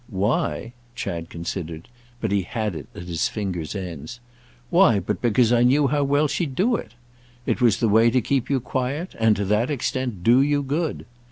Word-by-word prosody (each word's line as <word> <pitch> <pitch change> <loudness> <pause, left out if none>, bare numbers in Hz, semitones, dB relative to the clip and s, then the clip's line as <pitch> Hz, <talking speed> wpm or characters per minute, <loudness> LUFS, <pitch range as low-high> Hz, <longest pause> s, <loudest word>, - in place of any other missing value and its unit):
"'Why'?" 110 +3 -1 0.2
Chad 85 -7 -4
considered, 85 -1 -6 0.3
but 110 - -1
he 100 -1 +2
had 110 +1 -3
it 75 -4 -7
at - - -7
his 85 -2 -1
fingers' 95 -5 -4
ends. 90 - -6 0.5
"Why - - +5
but - - -3
because 120 0 +3
I 120 - +4
knew 135 +4 +4
how 145 +1 +1
well 145 +2 +2
she'd 145 -2 -2
do 230 - +2
it? 115 - -6 0.5
It - - -1
was 115 -4 +4
the 115 - +1
way 110 +2 +5
to 130 +2 +2
keep 130 +1 -1
you 140 -2 +2
quiet 135 +7 -3
and, 110 -1 +4
to 100 0 -2
that 105 +5 +1
extent, 125 - -2
do 120 +5 +5
you 145 0 +1
good. 150 +4 -2
115 Hz, 190 wpm, -23 LUFS, 95-135 Hz, 0.5 s, Why